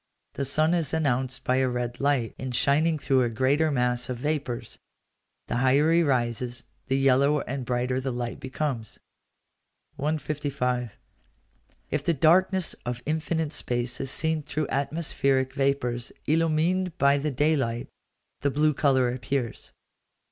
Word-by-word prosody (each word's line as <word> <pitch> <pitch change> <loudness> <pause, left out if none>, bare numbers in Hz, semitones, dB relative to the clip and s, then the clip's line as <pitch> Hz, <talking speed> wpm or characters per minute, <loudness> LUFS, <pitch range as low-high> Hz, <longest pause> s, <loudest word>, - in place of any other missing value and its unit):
The 140 - -2
sun 155 +5 +2
is 165 -3 0
announced 130 -4 0
by 130 - +1
a 130 0 +2
red 120 0 -3
light, 135 -5 +1
in 130 -1 -4
shining 155 +6 +2
through 135 -2 +2
a 120 - +1
greater 135 +7 +2
mass 125 -2 0
of 125 - -3
vapours. 145 -3 -3 0.7
The - - -2
higher 135 +5 +3
he 170 +1 +5
rises, 120 -4 -1 0.2
the 135 - +1
yellower 135 +2 +3
and 135 +1 -3
brighter 125 +1 -1
the 130 0 -2
light 120 -1 -4
becomes. 130 -4 -4 1.0
155. 140 -6 -2 0.9
If 150 -2 -1
the 170 0 +1
darkness 185 +4 +3
of 120 0 -4
infinite 160 0 -1
space 120 -2 -2
is 135 - -2
seen 160 +3 0
through 150 0 -3
atmospheric 140 -2 0
vapours 135 -3 -1
illumined 165 +3 +1
by 140 0 +4
the 150 +2 -1
day 150 +4 +2
light, 120 -4 -2 0.5
the 140 - +1
blue 150 +2 +2
colour 130 -4 +2
appears. 125 -1 -3
135 Hz, 140 wpm, -26 LUFS, 125-155 Hz, 1.0 s, he